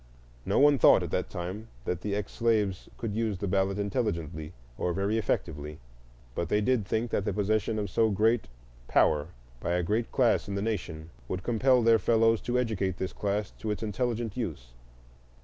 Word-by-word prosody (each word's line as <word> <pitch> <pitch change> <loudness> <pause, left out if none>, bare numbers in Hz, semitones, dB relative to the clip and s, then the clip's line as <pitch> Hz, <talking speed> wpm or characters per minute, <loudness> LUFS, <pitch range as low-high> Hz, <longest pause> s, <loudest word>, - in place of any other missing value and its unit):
No - - +1
one 145 -1 +6
thought, - - +6
at - - -5
the - - +1
time, 95 +6 -6 0.2
that 90 -1 -2
the 100 -1 -2
ex 105 -1 -3
slaves 110 -5 0
could 115 -3 -3
use 110 -2 -1
the 100 - -3
ballot 95 +1 +1
intelligently 85 - -2 0.2
or 90 - -1
very 100 +4 0
effectively; 75 -7 -2 0.6
but 85 +4 -3
they 105 - +3
did 110 -2 +1
think 115 +1 -1
that 100 - 0
the 105 - -1
possession 110 +1 0
of 105 -1 -1
so 110 +4 +2
great 110 +3 +2 0.4
power 75 -1 +3 0.3
by 85 - -1
a 90 0 +1
great 110 +6 -1
class 125 -4 +2
in 100 - -3
the 100 - -1
nation 85 -7 -4 0.2
would 95 0 -4
compel 125 +1 +3
their 115 0 +5
fellows 115 -1 +3
to 125 0 -1
educate 100 -7 -1
this 95 - -3
class 105 0 -2
to 110 - -4
its 105 +1 -2
intelligent 115 +1 -2
use. 75 - -5
105 Hz, 185 wpm, -29 LUFS, 95-115 Hz, 0.6 s, one